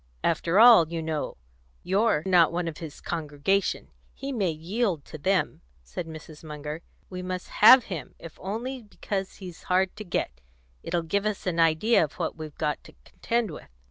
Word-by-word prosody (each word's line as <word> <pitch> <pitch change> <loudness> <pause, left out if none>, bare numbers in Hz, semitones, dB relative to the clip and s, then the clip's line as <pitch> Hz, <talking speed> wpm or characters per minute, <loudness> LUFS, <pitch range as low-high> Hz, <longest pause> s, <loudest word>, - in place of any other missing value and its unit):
"After 170 +3 +2
all, 225 -8 +8
you 170 - -2
know, 160 -2 -3 0.5
you're 195 -4 +2
not 175 -4 +5
one 175 0 -2
of 160 - -6
his 160 -3 -9
congregation; 160 +4 -1 0.3
he 275 +1 -5
may 205 -8 0
yield 170 - -2
to 155 - -9
them," 190 +4 0 0.2
said 65 - -6
Mrs. 155 -1 -11
Munger. 150 0 -6 0.3
"We 180 0 -5
must 185 0 -5
have 250 +4 +10
him 170 - -7
if 165 - -12
only 240 +7 -4
because 200 -2 -5
he's 180 -3 -10
hard 185 0 +2
to 215 - -6
get. 65 - -3 0.4
It'll 170 -1 -2
give 200 +5 0
us 210 -2 -3
an 175 -2 -1
idea 165 +7 +4
of 150 - -4
what - - -3
we've 155 -2 -9
got 150 -2 -2
to - - -15
contend 230 -4 -2
with." 150 - -10
175 Hz, 175 wpm, -26 LUFS, 160-200 Hz, 0.5 s, have